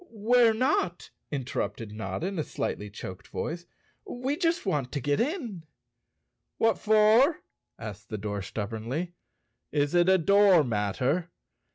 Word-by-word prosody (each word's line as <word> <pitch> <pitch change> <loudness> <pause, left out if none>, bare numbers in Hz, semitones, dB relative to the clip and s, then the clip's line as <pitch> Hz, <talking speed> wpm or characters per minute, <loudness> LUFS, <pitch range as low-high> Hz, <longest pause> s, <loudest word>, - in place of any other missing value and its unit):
"We're 230 +1 +3
not!" 220 - 0 0.2
interrupted 115 -6 -3
Notta, 110 +9 -4
in 190 -2 -3
a - - +1
slightly 105 -6 -4
choked 95 -1 -9
voice. 170 +2 -5 0.4
"We 270 - -3
just 335 -3 0
want 145 -9 -1
to 145 - -1
get 145 +2 0
in." 245 - -2 1.0
"What 225 -3 +2
for?" 220 +8 +4 0.4
asked 110 -1 -8
the 110 - -3
door 105 0 -4
stubbornly. 115 - -4 0.6
"Is 145 0 +1
it 175 +1 +4
a 190 - +6
door 195 -1 +5
matter? 125 - -1
170 Hz, 135 wpm, -28 LUFS, -, 1.0 s, a